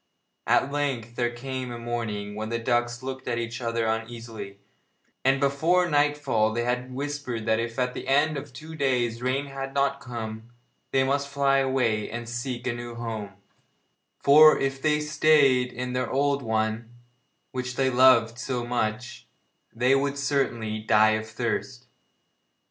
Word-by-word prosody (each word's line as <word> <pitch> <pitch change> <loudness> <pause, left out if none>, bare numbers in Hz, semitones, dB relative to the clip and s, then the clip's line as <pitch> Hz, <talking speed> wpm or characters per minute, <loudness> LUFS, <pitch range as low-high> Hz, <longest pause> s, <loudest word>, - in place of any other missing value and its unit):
At 140 - +3
length 135 -6 -2
there 120 -1 +1
came 130 +1 -5
a 120 - -5
morning 115 -4 -4
when 110 +1 -5
the 115 - -1
ducks 120 +1 -1
looked 130 0 -6
at 120 - -1
each 120 +1 -4
other 115 -1 -1
uneasily, 115 -2 -5 0.7
and 135 +1 +3
before 160 +6 +2
nightfall 145 -7 +2
they 120 +2 -1
had 125 +1 -2
whispered 135 -4 -4
that 110 0 +2
if 115 0 -4
at 125 -1 0
the - - -7
end 145 +3 +3
of 140 0 -6
two 155 +6 -10
days 125 -5 0
rain 130 +3 0
had 135 0 -6
not 140 0 +1
come, 115 -3 -7 0.4
they 135 0 +2
must 140 +1 0
fly 140 -1 +2
away 125 -6 0
and 120 0 -6
seek 120 +1 -4
a 125 - 0
new 120 0 -7
home, 110 -4 -5 0.8
for 155 +2 +7
if 135 0 -2
they 150 0 +2
stayed 150 -4 +3
in 125 +1 -4
their 125 0 -1
old 140 +1 +1
one, 110 0 -1 0.6
which 125 -1 -4
they 130 -1 +1
loved 120 -2 +5
so 125 -2 -3
much, 120 0 -3 0.4
they 125 +3 +2
would 140 +1 +1
certainly 120 -6 -1
die 110 0 +4
of 110 0 -2
thirst. 110 - -3
125 Hz, 160 wpm, -26 LUFS, 115-135 Hz, 0.8 s, for